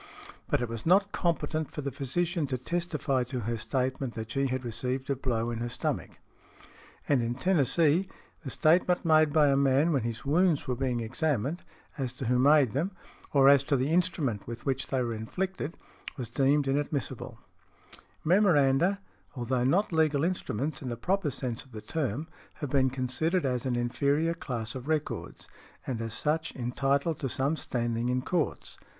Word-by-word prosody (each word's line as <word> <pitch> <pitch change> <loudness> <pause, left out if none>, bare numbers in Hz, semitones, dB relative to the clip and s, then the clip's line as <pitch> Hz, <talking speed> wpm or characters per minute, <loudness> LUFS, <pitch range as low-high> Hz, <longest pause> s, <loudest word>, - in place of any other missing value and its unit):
But - - +1
it - - -1
was 115 -1 -5
not 195 +4 +4
competent 160 -3 -1
for 150 - -6
the 140 0 -3
physician 160 +5 -1
to 130 -2 -2
testify 150 -2 -1
to 125 0 -4
her 115 +2 -2
statement 130 +1 -2
that 110 -1 -5
she 135 +3 +1
had 130 0 -3
received 125 +4 -2
a - - +1
blow 120 -3 -1
in 115 - -4
her 120 +1 -2
stomach. - - -3 0.9
And 140 -4 +3
in 120 +1 -1
Tennessee, 165 +2 +2 0.3
the 140 - -5
statement 175 +5 +3
made 155 -2 +5
by 150 -1 +5
a 135 - +4
man 140 +4 +3
when 135 - +2
his 115 +1 -4
wounds 165 +2 +2
were 125 - 0
being 125 -2 -1
examined, 135 - -1 0.4
as 130 -3 -2
to 130 - -6
who 125 +2 +2
made 140 -2 +5
them, 170 +9 -1 0.4
or 135 -2 +5
as 140 -1 +7
to 140 - +2
the 130 +2 0
instrument 165 - 0
with 120 0 -7
which 135 -1 0
they 130 -2 0
were 120 -1 -2
inflicted, 165 +9 -4 0.4
was 125 -4 -5
deemed 140 +3 +2
inadmissible. 140 -2 -2 0.9
Memoranda, 175 0 +3 0.3
although 125 0 -1
not 180 +8 +2
legal 155 -3 +2
instruments 155 - -2
in 130 - -4
the 120 - -4
proper 185 +4 0
sense 125 -3 -3
of 130 - -21
the 110 - -6
term, 150 +1 -2 0.3
have 145 -3 -5
been 130 -2 +3
considered 135 +7 0
as 125 0 -1
an 125 - 0
inferior 140 +7 +1
class 120 -9 -5
of 130 +1 -7
records, 155 -1 -3 0.4
and 120 -4 -3
as 115 -1 -4
such 155 +4 -1
entitled 135 +5 0
to 135 - -2
some 140 +5 +1
standing 120 -4 -2
in 125 0 0
courts. 175 -1 -2
135 Hz, 175 wpm, -29 LUFS, 125-160 Hz, 0.9 s, as